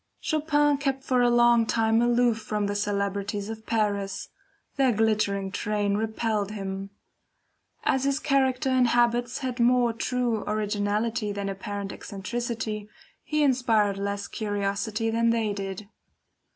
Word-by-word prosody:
Chopin 295 -2 +2
kept 270 -2 -1
for 255 -2 +2
a 245 - +4
long 240 -1 +4
time 225 0 +2
aloof 240 -1 +3
from 210 -1 -2
the 200 - -1
celebrities 200 0 -2
of 220 0 -8
Paris; 200 -3 -1 0.5
their 270 -2 +3
glittering 205 -3 +1
train 205 0 -1
repelled 220 -1 -1
him. 195 -1 -5 0.9
As 265 0 +1
his 275 0 +2
character 270 -2 +1
and 255 -1 +4
habits 240 +1 +2
had 250 -1 -3
more 240 0 +4
true 235 -1 -1
originality 210 +1 -1
than 200 -1 -3
apparent 195 0 -5
eccentricity, 215 +1 -4 0.3
he 305 -1 0
inspired 225 -7 +2
less 200 0 -3
curiosity 210 +2 -2
than 230 +1 +2
they 225 -2 +1
did. 195 0 -5
220 Hz, 130 wpm, -26 LUFS, 205-245 Hz, 0.9 s, a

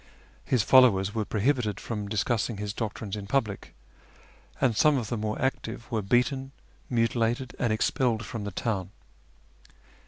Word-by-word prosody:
His 125 -5 +1
followers 105 -6 +5
were 110 -2 -1
prohibited 110 -1 0
from 105 -3 -4
discussing 110 +2 0
his 105 0 -4
doctrines 110 -2 -4
in 100 -1 -6
public, 110 -4 -2 0.8
and 125 -5 +2
some 150 +6 +4
of 115 -4 -3
the 120 - -1
more 110 0 -2
active 120 -2 -3
were 110 -2 0
beaten, 130 +6 +1 0.4
mutilated, 115 +1 0
and 120 -3 +1
expelled 115 +1 +1
from 115 -3 -5
the 100 - -3
town. 95 -2 -2
115 Hz, 145 wpm, -27 LUFS, 105-125 Hz, 0.8 s, followers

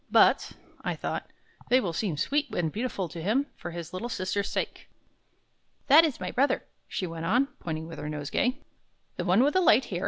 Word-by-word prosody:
"But," - - +4 0.3
I - - -1
thought, - - -4 0.4
"they 255 - +6
will 180 -9 -2
seem 170 -3 -1
sweet 290 - 0
and 165 -3 0
beautiful 210 -3 -2
to 165 +1 -8
him, 225 - +2
for - - -7
his 170 0 -7
little 230 +6 -4
sister's 195 -1 -1
sake." - - -3 1.0
"That 290 +4 +8
is 310 -6 0
my 180 -1 -3
brother," 275 +3 +2 0.2
she 185 - -3
went 165 -1 -5
on, 250 +8 +3
pointing 160 -1 -4
with 165 - -8
her 150 - -4
nosegay. 150 - -1 0.6
"The - - -2
one 195 +6 +5
with 290 - +3
the 370 - +4
light 260 -7 +5
hair?" 175 - -3
195 Hz, 195 wpm, -28 LUFS, 170-255 Hz, 1.0 s, That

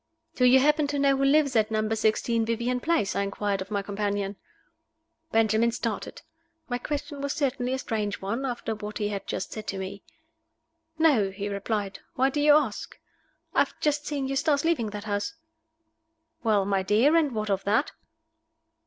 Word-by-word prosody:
"Do 250 - +2
you 255 +1 +7
happen 300 +2 +3
to 290 0 -2
know 275 -1 +3
who 270 - 0
lives 280 -1 +3
at 215 -1 +3
Number 215 0 0
Sixteen 225 +1 +1
Vivian 235 +2 -1
Place?" 315 - 0
I - - +1
inquired 200 0 -1
of 190 - -6
my 200 -2 -1
companion. 200 0 -2 1.0
Benjamin 225 +1 +3
started. 230 -2 -4 0.4
My 245 -1 -2
question 290 +1 -4
was 280 0 -1
certainly 260 -4 -1
a - - 0
strange 210 -5 -2
one, 215 +7 -3
after 240 -3 -3
what 210 -1 -6
he 210 -1 -1
had 200 -2 -5
just - - -4
said 215 -1 -7
to 195 - -3
me. 190 +1 -6 1.0
"No," 285 -12 +4
he 200 +1 -5
replied. 200 0 -3 0.2
"Why 265 +1 +2
do 290 - -1
you 295 0 +7
ask?" 270 -9 -1 0.6
"I - - +2
have - - +1
just 295 -1 0
seen 280 -3 -2
Eustace 285 +2 +1
leaving 295 -10 +1
that 205 0 -6
house." 205 +8 -2 1.1
"Well, 210 -4 +2
my 195 -1 +1
dear, 220 - +3
and 305 -5 +3
what 215 -1 -1
of 195 -1 0
that?" 215 +8 +2
225 Hz, 180 wpm, -27 LUFS, 205-275 Hz, 1.1 s, you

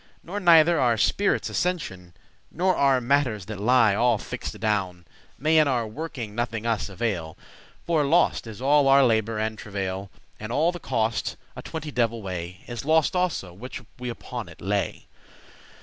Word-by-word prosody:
Nor 195 +4 -4
neither 170 -2 +6
our 120 -3 +3
spirits' 200 - +1
ascensioun, 95 - -3 0.4
Nor 185 +2 +1
our 135 -2 +3
matters 125 -6 +1
that 105 -1 -7
lie 115 -1 +4
all 120 +4 +3
fix'd - - -6
adown, 95 -5 -1 0.3
May 155 +4 +3
in 155 - +4
our 125 -4 +1
working 120 -2 -6
nothing 115 -1 -3
us 115 -3 -1
avail; 95 -6 -3 0.5
For 165 -3 +2
lost 155 -4 +2
is 110 +3 -8
all 145 0 +4
our 135 0 +6
labour 110 -1 +1
and 110 0 -2
travail, 95 -1 -4 0.3
And 110 +2 -6
all 155 +7 +2
the 175 - -8
cost, 115 -6 -1 0.2
a - - -7
twenty 160 -2 -6
devil 115 -3 0
way, 90 0 -6
Is 120 -2 -6
lost 160 +3 +2
also, 175 - -1
which 120 +6 -8 0.2
we 125 0 -4
upon 120 - -6
it - - -14
lay. 100 -1 -2
120 Hz, 165 wpm, -25 LUFS, 105-150 Hz, 0.5 s, neither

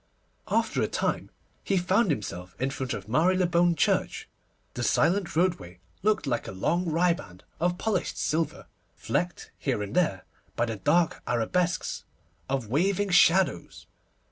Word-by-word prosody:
After - - +1
a - - +1
time - - -2 0.3
he 195 - +1
found 190 +4 +2
himself 90 - -4
in 130 +2 0
front 130 -1 -3
of - - -8
Marylebone 175 +5 +3
Church. - - 0 0.5
The - - -4
silent 190 -1 +1
roadway 165 - 0 0.2
looked 210 -5 +1
like 120 -4 -1
a - - -5
long 165 - 0
riband 165 - 0 0.2
of 175 +1 +1
polished 220 +2 -1
silver, 160 +1 -1 0.3
flecked 175 0 -3
here 125 -7 -1
and 100 - -7
there 155 - +1 0.3
by - - +1
the 115 -2 -4
dark 160 - +2
arabesques 170 +10 0 0.5
of 135 -3 -1
waving 190 - +1
shadows. 185 +1 +3
165 Hz, 140 wpm, -27 LUFS, 120-180 Hz, 0.5 s, Marylebone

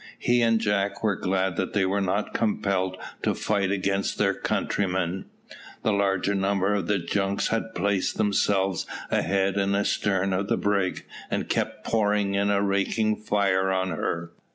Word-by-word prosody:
He 120 0 +2
and 115 -1 +3
Jack 100 -2 0
were 105 -3 +2
glad 95 -1 -1
that 95 - -2
they 100 -2 +2
were 100 +2 0
not 100 +2 -1
compelled 95 -4 0 0.2
to - - 0
fight 100 -3 0
against 100 0 0
their - - +2
countrymen. 95 -2 -1 0.6
The 110 - +2
larger 100 0 +1
number 100 0 +1
of 100 -4 -1
the 105 - +2
junks 95 +3 -1
had 115 0 -2
placed 100 +1 0
themselves 100 -2 +1 0.2
ahead 95 0 +1
and 100 0 +1
astern 95 -1 +1
of 100 +2 -1
the - - +1
brig, 100 -3 0 0.2
and - - -2
kept - - -2
pouring 105 -2 +1
in 100 +1 +1
a 100 0 +2
raking 100 +2 +1
fire 100 -3 +1
on 95 0 0
her. 85 0 -3
100 Hz, 160 wpm, -26 LUFS, 95-100 Hz, 0.6 s, and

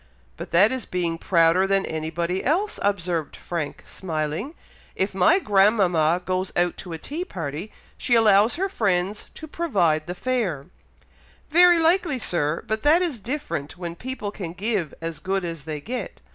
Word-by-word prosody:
"But - - -8
that 190 +6 +5
is 260 -3 -4
being 170 -2 -2
prouder 170 +2 +3
than 195 0 +2
anybody 165 +3 -2
else," 380 +9 0
observed 175 -6 -1
Frank, 165 -4 -5
smiling. 160 - -4 0.4
"If 190 +1 -1
my 190 - +4
grandmama 195 - +3
goes 185 0 -1
out 175 0 +1
to 180 -3 -7
a - - -4
tea 300 - -5
party, 170 - -6 0.3
she 240 - +2
allows 215 -1 +5
her 385 +3 0
friends 200 - -1
to 315 - -9
provide 180 - 0
the 180 - -4
fare." 200 - -1 0.9
"Very 350 +2 +7
likely, 330 -3 +2
Sir! 165 -8 -1
but 220 0 -2
that 320 +5 +4
is 310 -10 -2
different 225 - -4
when 170 -2 -5
people 250 -2 -5
can 175 -5 -6
give 195 -4 -1
as 165 -1 -4
good 190 -1 -2
as 165 -4 -6
they 155 -2 -4
get. 245 - -6
190 Hz, 160 wpm, -24 LUFS, 165-245 Hz, 0.9 s, Very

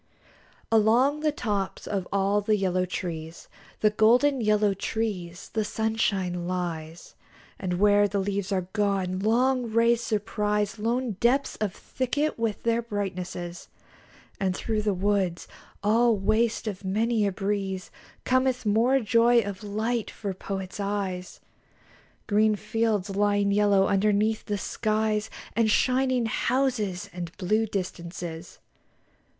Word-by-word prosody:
Along 235 +7 +4
the 305 0 +1
tops 205 -8 -3
of 195 -3 -3
all 200 +1 +2
the 215 +1 +2
yellow 185 -2 0
trees, 165 -2 -5 0.3
The 215 - +4
golden 245 +6 +4
yellow 210 -2 +3
trees, 195 -4 -4
the 220 - +1
sunshine 200 -5 -1
lies; 170 -2 -4 0.5
And 185 -2 -2
where 205 +2 +4
the 200 - -2
leaves 200 0 -2
are 185 -2 0
gone, 195 -3 0
long 240 +3 +2
rays 230 +1 +3
surprise 210 -1 -1
Lone 235 -1 -1
depths 265 +4 +2
of 215 -3 -1
thicket 280 +2 -2
with 225 -2 -2
their 230 0 +2
brightnesses; 185 -5 -5 0.7
And 190 -2 0
through 220 -2 -1
the 210 -2 0
woods, 190 -2 0 0.4
all 225 +2 +4
waste 220 +4 +1
of 200 -2 -5
many 215 +2 +1
a - - 0
breeze, 195 -1 -3 0.3
Cometh 255 -1 +1
more 235 +6 +3
joy 235 +1 +4
of 200 -3 -6
light 220 +3 -2
for 200 -3 -5
Poet's 190 +1 -6
eyes 195 -3 -3 0.8
Green 215 +1 +3
fields 210 -1 -1
lying 205 0 +2
yellow 200 -1 +4
underneath 210 +2 +1
the 205 -1 -2
skies, 215 +1 -1 0.3
And 230 -1 +3
shining 255 +1 +2
houses 225 -6 0
and 175 -2 -5
blue 215 +4 +1
distances. 175 -3 -5
210 Hz, 125 wpm, -26 LUFS, 190-225 Hz, 0.8 s, Along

